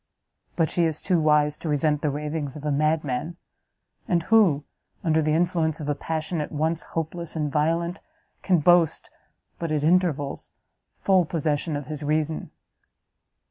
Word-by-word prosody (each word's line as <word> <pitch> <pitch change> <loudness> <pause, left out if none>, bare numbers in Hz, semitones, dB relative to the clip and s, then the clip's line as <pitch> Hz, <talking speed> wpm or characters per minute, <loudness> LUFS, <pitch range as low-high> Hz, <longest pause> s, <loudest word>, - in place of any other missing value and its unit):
But 165 -2 +1
she 175 - +2
is 160 -1 -1
too 180 -3 +1
wise 150 -1 +2
to 160 - -4
resent 150 0 +1
the 150 - +1
ravings 150 0 -4
of 150 - -9
a 150 - +1
madman; 155 +1 0 0.7
and 170 -2 +1
who, 185 -9 +4 0.4
under 160 -1 +2
the 155 0 +1
influence 165 -2 +1
of 150 - -5
a 145 - +1
passion 160 +2 -3
at 150 - -5
once 160 +2 0
hopeless 165 +1 -3
and 150 -2 -1
violent, 165 +4 0 0.4
can 180 -4 +2
boast, 175 0 +3 0.5
but 165 -2 -3
at 150 -1 0
intervals, 160 -4 +1 0.4
full 190 -2 +2
possession 155 -1 -1
of 145 -1 -4
his 150 0 -6
reason?" 155 +1 -1
155 Hz, 155 wpm, -25 LUFS, 150-170 Hz, 0.7 s, who